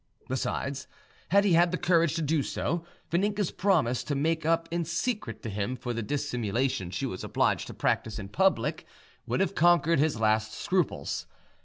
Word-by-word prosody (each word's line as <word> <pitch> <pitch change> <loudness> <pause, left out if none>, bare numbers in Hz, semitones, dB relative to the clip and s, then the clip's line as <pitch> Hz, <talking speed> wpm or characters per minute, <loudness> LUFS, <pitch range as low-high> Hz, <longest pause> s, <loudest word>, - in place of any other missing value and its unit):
Besides, 135 +1 -3 0.4
had 200 +3 +5
he 200 -4 +3
had 170 +1 +5
the 180 - 0
courage 170 -2 +2
to 165 - -1
do 155 0 +2
so; 165 +4 -2 0.3
Vaninka's 200 +2 +1
promise 160 -11 +1
to 145 - -1
make 160 +3 0
up 165 0 +2
in 170 0 0
secret 170 - -3
to 115 - -4
him 105 +5 -2
for 125 -1 -4
the 115 - -2
dissimulation 120 -4 -1
she 95 +9 -3
was 95 -8 -5
obliged - - +1
to - - -9
practise 110 -1 0
in 100 -2 -6
public 190 - +1 0.4
would - - 0
have 195 - +1
conquered 170 -2 +4
his 150 -5 +1
last 110 0 +1
scruples. 185 -3 -1
155 Hz, 175 wpm, -28 LUFS, 120-175 Hz, 0.4 s, had